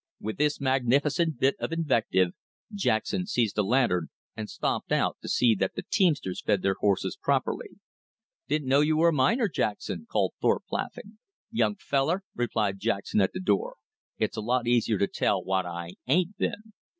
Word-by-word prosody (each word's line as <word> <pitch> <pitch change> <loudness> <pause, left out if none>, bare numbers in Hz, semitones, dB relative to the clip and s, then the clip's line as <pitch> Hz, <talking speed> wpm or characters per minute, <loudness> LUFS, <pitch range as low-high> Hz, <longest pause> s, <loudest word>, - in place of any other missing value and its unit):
With 110 +1 -5
this 150 0 +1
magnificent 140 +4 +1
bit 135 +1 +3
of - - -3
invective, 120 - +2 0.4
Jackson 180 - 0
seized 120 - 0
a - - +6
lantern 100 -6 +2 0.3
and 110 -1 -6
stumped - - -2
out - - +1
to - - -7
see 120 -2 +4
that 95 -2 -1
the - - -4
teamsters 150 - +1
fed 100 - +1
their 95 - +2
horses 100 - +1
properly. 410 +2 -1 0.7
"Didn't 150 -3 -1
know 135 +2 +4
you 155 +1 +2
were 170 +2 +5
a - - 0
miner, 150 - +3
Jackson," 100 - -3
called - - +1
Thorpe, - - +2
laughing. 210 +1 -5 0.3
"Young 215 -2 +1
feller," 165 +1 0
replied 105 -5 -1
Jackson 100 -1 0
at 95 - +1
the 185 - -4
door, 455 - 0 0.4
"it's - - -1
a - - -1
lot 120 +2 0
easier 115 -3 +2
to 100 - +2
tell - - 0
what 95 -1 0
I 85 0 -6 0.2
AIN'T 180 +8 +2
been." 215 +3 -3
130 Hz, 175 wpm, -27 LUFS, 105-165 Hz, 0.7 s, a